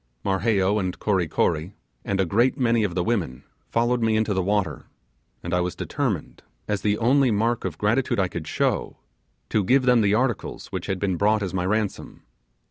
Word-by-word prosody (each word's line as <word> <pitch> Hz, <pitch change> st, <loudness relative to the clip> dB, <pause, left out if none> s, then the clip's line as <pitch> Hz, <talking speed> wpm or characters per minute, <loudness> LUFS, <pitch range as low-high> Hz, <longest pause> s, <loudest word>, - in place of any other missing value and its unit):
Marheyo 100 Hz, 0 st, +1 dB
and 95 Hz, -2 st, -3 dB
Kory 95 Hz, -5 st, 0 dB
Kory, 80 Hz, +5 st, -1 dB, 0.3 s
and 100 Hz, -1 st, -2 dB
a 95 Hz, -, +3 dB
great 115 Hz, -, +2 dB
many 115 Hz, -4 st, +2 dB
of 95 Hz, -4 st, -2 dB
the 90 Hz, -, +1 dB
women, 90 Hz, -, -2 dB, 0.3 s
followed 120 Hz, +1 st, +1 dB
me 110 Hz, -1 st, +2 dB
into 110 Hz, -1 st, +1 dB
the 95 Hz, -, +1 dB
water, 95 Hz, -4 st, -1 dB, 0.6 s
and 85 Hz, -, -4 dB
I 90 Hz, -, +2 dB
was 90 Hz, 0 st, -2 dB
determined, -, -, -3 dB, 0.3 s
as 105 Hz, -1 st, -1 dB
the 105 Hz, 0 st, +1 dB
only 130 Hz, +4 st, +3 dB
mark 115 Hz, +1 st, 0 dB
of 85 Hz, -4 st, -4 dB
gratitude 110 Hz, +4 st, +1 dB
I 95 Hz, -, +2 dB
could 85 Hz, -3 st, -6 dB
show, -, -, -1 dB, 0.5 s
to 110 Hz, -, +1 dB
give 130 Hz, +7 st, +3 dB
them 125 Hz, -2 st, +4 dB
the 100 Hz, 0 st, +3 dB
articles 120 Hz, -1 st, -2 dB
which -, -, -4 dB
had 95 Hz, -, -1 dB
been 95 Hz, -2 st, -1 dB
brought 105 Hz, +2 st, +2 dB
as 95 Hz, -, -4 dB
my 90 Hz, -1 st, -1 dB
ransom. 105 Hz, 0 st, -2 dB
105 Hz, 195 wpm, -24 LUFS, 95-115 Hz, 0.6 s, them